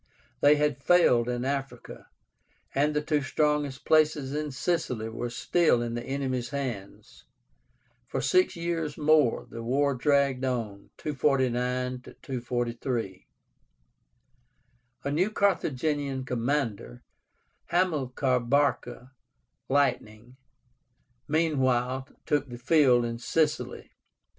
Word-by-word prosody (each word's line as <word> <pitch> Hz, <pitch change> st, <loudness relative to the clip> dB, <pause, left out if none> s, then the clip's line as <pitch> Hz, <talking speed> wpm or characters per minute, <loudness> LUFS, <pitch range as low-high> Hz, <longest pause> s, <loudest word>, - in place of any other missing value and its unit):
They 145 Hz, +1 st, +6 dB
had 150 Hz, -2 st, 0 dB
failed 125 Hz, -9 st, +4 dB
in 125 Hz, 0 st, -2 dB
Africa, 135 Hz, -3 st, -5 dB, 0.7 s
and 150 Hz, +2 st, +1 dB
the 150 Hz, -, 0 dB
two 150 Hz, -1 st, +1 dB
strongest 145 Hz, 0 st, -1 dB
places 150 Hz, -3 st, +2 dB
in 150 Hz, 0 st, -2 dB
Sicily 130 Hz, -5 st, -2 dB
were 115 Hz, +2 st, -4 dB
still 140 Hz, 0 st, +2 dB
in 120 Hz, -1 st, -4 dB
the 120 Hz, -, -3 dB
enemy's 130 Hz, -1 st, -3 dB
hands. 125 Hz, -9 st, -6 dB, 0.8 s
For -, -, -3 dB
six 365 Hz, 0 st, +2 dB
years 165 Hz, -3 st, -3 dB
more 150 Hz, -5 st, +3 dB
the 115 Hz, -, -8 dB
war 140 Hz, +4 st, +1 dB
dragged 140 Hz, 0 st, +1 dB
on 115 Hz, -6 st, -3 dB
(249 125 Hz, -3 st, 0 dB, 0.2 s
243). 120 Hz, -5 st, -3 dB, 1.8 s
A 140 Hz, -, -2 dB
new 175 Hz, +8 st, +1 dB
Carthaginian 145 Hz, -, 0 dB
commander, 120 Hz, -, -2 dB, 0.6 s
HAMILCAR 140 Hz, -7 st, +1 dB
BARCA 125 Hz, -1 st, 0 dB, 0.6 s
(Lightning), 125 Hz, -4 st, 0 dB, 0.9 s
meanwhile 130 Hz, -5 st, +1 dB, 0.2 s
took 145 Hz, -3 st, 0 dB
the 120 Hz, -, -7 dB
field 125 Hz, -2 st, +4 dB
in 115 Hz, 0 st, -4 dB
Sicily. 155 Hz, +4 st, -1 dB
135 Hz, 100 wpm, -27 LUFS, 120-150 Hz, 1.8 s, They